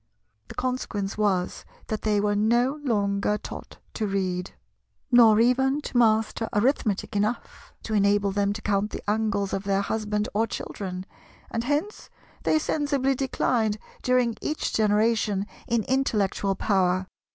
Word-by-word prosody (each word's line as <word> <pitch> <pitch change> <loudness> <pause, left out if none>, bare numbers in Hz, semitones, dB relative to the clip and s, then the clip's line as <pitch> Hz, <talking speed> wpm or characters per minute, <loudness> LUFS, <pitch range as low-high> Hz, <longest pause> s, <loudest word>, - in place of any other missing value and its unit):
The - - -10
consequence 240 -6 -2
was 195 -4 0 0.2
that 215 - -3
they 210 -1 +1
were 205 0 +1
no 240 +7 +2
longer 205 -4 +1
taught - - -9 0.2
to 215 - -2
read, 185 -2 -1 0.6
nor 225 -3 +7
even 265 +4 +3
to - - -8
master 225 -1 +2
Arithmetic 210 -3 +1
enough 215 +4 -2
to 220 - -4
enable 200 -1 +3
them 200 0 +1
to 215 - -8
count 205 0 +1
the - - -8
angles 205 -2 0
of 195 - -2
their 195 -1 +1
husband 210 0 -1
or 220 +2 +1
children; 185 -4 -5 0.5
and 230 +1 -2
hence 295 +10 -2 0.3
they - - +2
sensibly 285 -3 0
declined 240 -5 0 0.2
during 250 -2 +2
each 305 - -2
generation 210 -1 +2 0.2
in 235 -3 +1
intellectual 210 -7 0
power. 185 -2 +1
215 Hz, 140 wpm, -26 LUFS, 200-245 Hz, 0.6 s, nor